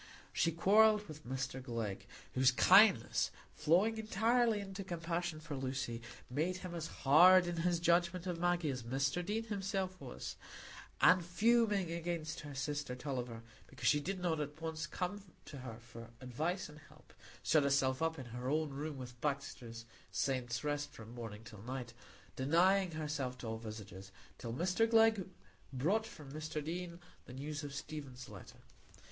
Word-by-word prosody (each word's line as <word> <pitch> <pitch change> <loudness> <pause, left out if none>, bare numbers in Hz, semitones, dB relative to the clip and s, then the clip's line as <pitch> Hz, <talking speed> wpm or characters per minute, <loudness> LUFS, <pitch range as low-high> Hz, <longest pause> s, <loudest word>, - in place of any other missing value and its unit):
She 165 - +2
quarrelled 210 +5 +5
with 155 -4 -10
Mr 130 0 -3
Glegg, 115 -6 -4 0.3
whose 130 0 +5
kindness, 125 - +6 0.2
flowing 190 +9 +3
entirely 225 +1 +2
into 195 0 -6
compassion 170 -2 -3
for 155 -2 -6
Lucy, 130 -3 -3 0.3
made 160 +8 -1
him 180 - -5
as 165 -1 -3
hard 175 +6 +6
in 175 -1 -3
his 170 0 +1
judgment 170 +1 +2
of 175 -2 -3
Maggie 175 -3 +1
as 130 -1 -4
Mr 135 +8 0
Deane 210 +5 -1
himself 195 -3 -3
was; 125 -3 -6 0.6
and 180 -1 +7
fuming 205 0 +2
against 170 -2 -3
her 145 -2 -8
sister 145 -1 -2
Tulliver 125 -4 -4 0.2
because - - -3
she 150 - +5
did 185 +6 -3
not 170 -3 0
at 150 +1 -4
once 160 -1 -3
come 185 +5 -3 0.2
to 140 - -8
her 120 -3 -7
for 115 -1 -11
advice 155 +9 -2
and 150 0 -13
help, - - -19 0.3
shut 155 - +4
herself 135 -1 +2
up 165 0 0
in 130 - -6
her 125 +2 -5
own 155 0 +1
room 145 +1 -4
with 125 -2 -9
Baxter's 120 -5 -3 0.3
"Saints' 125 -2 -1
Rest" 145 0 -1
from 115 -4 -11
morning 115 -3 -7
till 105 -3 -11
night, 125 0 -5 0.4
denying 180 +8 +4
herself 145 -5 -3
to 120 - -7
all 110 0 -3
visitors, 105 -3 -8 0.3
till 115 - -5
Mr 185 - +1
Glegg 225 -4 +5 0.4
brought 185 +13 +1
from 145 -3 -11
Mr 155 0 -4
Deane 170 +1 -4 0.3
the 125 - -10
news 145 +3 -5
of 145 - -5
Stephen's 140 -4 -7
letter. 105 -3 -12
155 Hz, 160 wpm, -35 LUFS, 130-180 Hz, 0.6 s, and